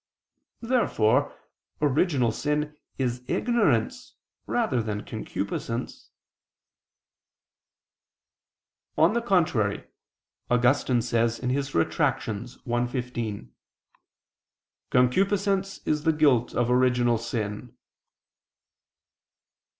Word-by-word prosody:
Therefore 145 - +1 0.4
original 145 -4 +2
sin 150 +4 -2 0.2
is 125 -2 -1
ignorance 205 - 0 0.3
rather 125 -2 +1
than 105 -2 -4
concupiscence. - - -5 2.9
On 165 +6 +4
the 235 - +1
contrary, 160 - +1 0.7
Augustine 125 0 +2
says 115 0 0
(Retract. 130 -9 0
i, 120 +2 -3
15): 120 - -5 1.4
"Concupiscence 195 - +1
is 150 -1 0
the 160 -1 +3
guilt 140 -6 +2
of 120 0 +1
original 125 -2 +3
sin." 115 0 -5
125 Hz, 70 wpm, -26 LUFS, 115-150 Hz, 2.9 s, On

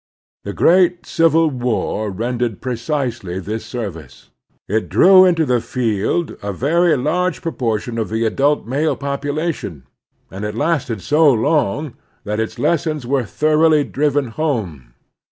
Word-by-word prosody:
The - - -5
great 180 0 +3
Civil 165 -1 +2
War 120 -4 -2
rendered 115 +2 -2
precisely 120 - -3
this 105 +4 -5
service. 100 - -7 0.4
It 110 +2 -1
drew 185 0 +7
into 170 -3 +2
the 125 -3 +1
field 120 - -1
a 100 - -3
very 155 - +2
large 180 +8 -1
proportion 115 - -2
of 110 - -2
the 110 +1 -1
adult 140 +6 +1
male 140 +7 0
population, 140 - -4 0.5
and 95 +2 -7
it 105 0 -4
lasted 135 - -1
so 150 0 +4
long 140 +2 0 0.3
that 105 +1 -3
its 110 - -3
lessons 155 -4 0
were 130 -1 0
thoroughly 155 +4 +3
driven 145 -2 0
home. 100 - -3
130 Hz, 130 wpm, -18 LUFS, 110-155 Hz, 0.5 s, drew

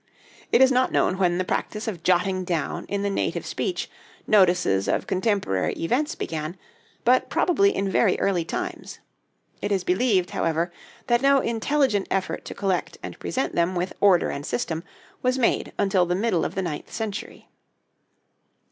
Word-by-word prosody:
It - - +5
is 265 - +5
not 255 0 +2
known 185 - +1
when 175 -2 +2
the 185 - +1
practice 210 +4 -3
of 185 -7 -4
jotting 185 +2 +1
down 170 -4 -2
in 200 0 -2
the 200 - 0
native - - -2
speech 370 - -3 0.4
notices 180 - +3
of - - 0
contemporary 190 - 0
events 260 - -1
began, 155 +2 -4 0.5
but 250 +2 +3
probably 395 +3 +2
in 195 - 0
very 190 - +2
early 185 -4 +1
times. - - -5 0.6
It 205 - -2
is 195 -3 +1
believed, 185 -1 +1
however, 165 +2 0 0.3
that 240 0 +2
no 275 0 +5
intelligent 235 -2 +1
effort 190 -1 -2
to - - -7
collect 190 -3 -1
and - - -7
present 265 - -2
them 170 +2 +1
with 180 +1 -2
order 190 -4 +4
and 140 - -5
system 165 -4 -2 0.4
was 255 +1 +1
made 245 - +1
until 190 -3 +2
the 175 - 0
middle 195 -4 +1
of - - -4
the 190 - -1
ninth 160 -4 -5
century. 220 -3 -6
195 Hz, 165 wpm, -24 LUFS, 175-230 Hz, 0.6 s, It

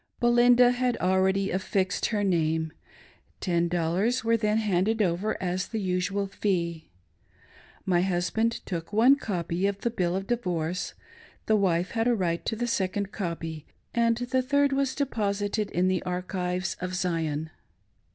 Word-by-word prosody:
Belinda 245 0 +5
had 250 -1 0
already 190 +1 +2
affixed 190 0 0
her 210 -2 -1
name. 160 -4 0 0.7
Ten 170 -2 +1
dollars 175 +8 0
were 230 0 +3
then 215 -1 +1
handed 215 +1 +1
over 195 +2 0
as 185 0 -2
the 225 - -3
usual 190 +1 -1
fee; 175 -5 -2 1.0
My 175 -2 +3
husband 190 +5 0
took, 165 -2 -5
one 235 +6 +6
copy 180 -6 -2
of 200 0 -3
the 235 - 0
■" - - -23
bill 175 -1 0
of 195 0 -2
divorce," 180 -7 -2 0.5
the 220 - +3
wife 180 -3 +1
had 225 0 0
a 240 - +3
right 170 -4 -1
to 225 - 0
a 240 +2 -2
second 200 -3 -1
copy, 165 -6 -5 0.3
and 230 -1 +2
the 250 +2 0
third 285 +2 +2
was 270 -1 0
deposited 210 -6 -1
in 180 +2 +1
the 185 -1 +1
archives 180 0 -2
of 185 0 -3
Zion. 160 -4 -1
190 Hz, 150 wpm, -27 LUFS, 175-225 Hz, 1.0 s, one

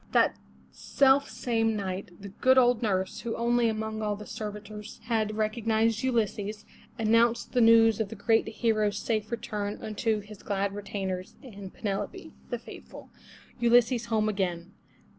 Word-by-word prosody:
That - - +4 0.4
self 275 0 +3
same 225 -2 0
night, 195 0 -4
the 200 - -8
good 260 +6 +3
old 245 -2 +4
nurse, 190 -4 -1
who 235 -1 -4
only 235 0 +2
among 220 0 -3
all 210 -1 -1
the 210 +1 -9
servitors 210 0 -7
had 215 -2 -1
recognised 220 +1 +1
Ulysses, 215 -4 -1 0.3
announced 230 +1 +2
the 245 - +3
news 225 -1 +6
of 220 -3 -1
that 225 - -7
great 225 +2 +2
hero's 215 -2 0
safe 215 -1 -2
return 210 -3 -4
unto 215 0 -1
his 210 0 -12
glad 200 -1 -1
retainers 195 -2 -5
and 200 -7 -9
Penelope, 200 -3 -4 0.2
the - - -2
faithful. - - -12 0.5
Ulysses 235 0 +4
home 220 -2 +1
again 180 -4 -2
215 Hz, 145 wpm, -28 LUFS, 205-230 Hz, 0.5 s, news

